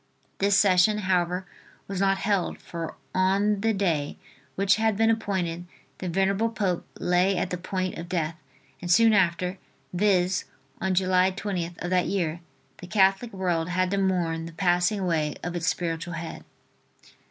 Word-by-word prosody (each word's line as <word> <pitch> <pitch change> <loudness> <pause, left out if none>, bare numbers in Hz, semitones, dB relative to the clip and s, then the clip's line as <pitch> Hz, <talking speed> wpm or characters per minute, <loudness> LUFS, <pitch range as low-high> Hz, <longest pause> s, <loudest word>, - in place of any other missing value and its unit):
This 200 0 +3
session, 195 +1 +4
however, 180 -2 0 0.4
was 195 -2 -4
not 195 0 +2
held, 195 -3 0
for 165 -2 -7 0.2
on 195 +2 +2
the 225 +1 +2
day 170 -8 -1 0.4
which 195 +1 +3
had 220 -2 +1
been 225 +1 +4
appointed 180 -6 -2 0.3
the 185 - -3
venerable 195 +5 +1
pope 200 -6 -2
lay 180 +2 +2
at - - -2
the 180 - -1
point 185 0 -3
of 170 +1 -7
death 165 -3 -1 0.5
and 175 - -5
soon 225 +5 +6
after, 180 -1 +1 0.3
viz., 185 -1 +2 0.4
on 190 0 0
July 185 0 +3
20th, 180 -3 -4
of 175 - -3
that 180 -1 +2
year, 170 -4 -1 0.4
the 180 - -9
Catholic 195 +3 +2
world 180 -3 -1
had 185 +1 0
to 200 - +1
mourn 170 -4 0
the 165 - -10
passing 180 +4 +1
away 160 -5 0
of 175 0 -4
its 170 0 -2
spiritual 170 0 -2
head. 165 0 -7
185 Hz, 160 wpm, -26 LUFS, 175-195 Hz, 0.5 s, soon